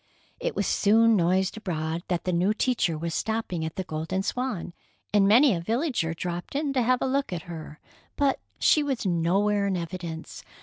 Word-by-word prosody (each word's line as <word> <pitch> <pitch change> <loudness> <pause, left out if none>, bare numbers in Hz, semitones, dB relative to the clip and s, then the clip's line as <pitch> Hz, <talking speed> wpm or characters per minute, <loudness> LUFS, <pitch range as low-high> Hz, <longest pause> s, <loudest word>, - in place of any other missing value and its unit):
It - - -2
was - - 0
soon 225 +2 +4
noised 185 +3 +1
abroad 165 -5 -3
that 175 -2 -1
the 180 - -1
new 185 +5 +2
teacher 220 -10 +1
was 165 +1 -3
stopping 220 -6 -2
at 160 0 -4
the 190 - -2
Golden 165 +4 -3
Swan, 240 -8 -3 0.4
and 200 -2 +5
many 245 +5 +6
a 170 - -1
villager 230 - -1
dropped 175 +6 -5
in 285 -1 0
to 260 - +2
have 250 +1 +2
a - - +1
look 275 -2 0
at 170 -3 -4
her. 160 -2 -9 0.4
But 280 -2 +1 0.2
she 305 - +4
was 270 -6 -2
nowhere 195 +4 +2
in 190 -2 0
evidence. 170 -1 -6
190 Hz, 185 wpm, -26 LUFS, 170-235 Hz, 0.4 s, many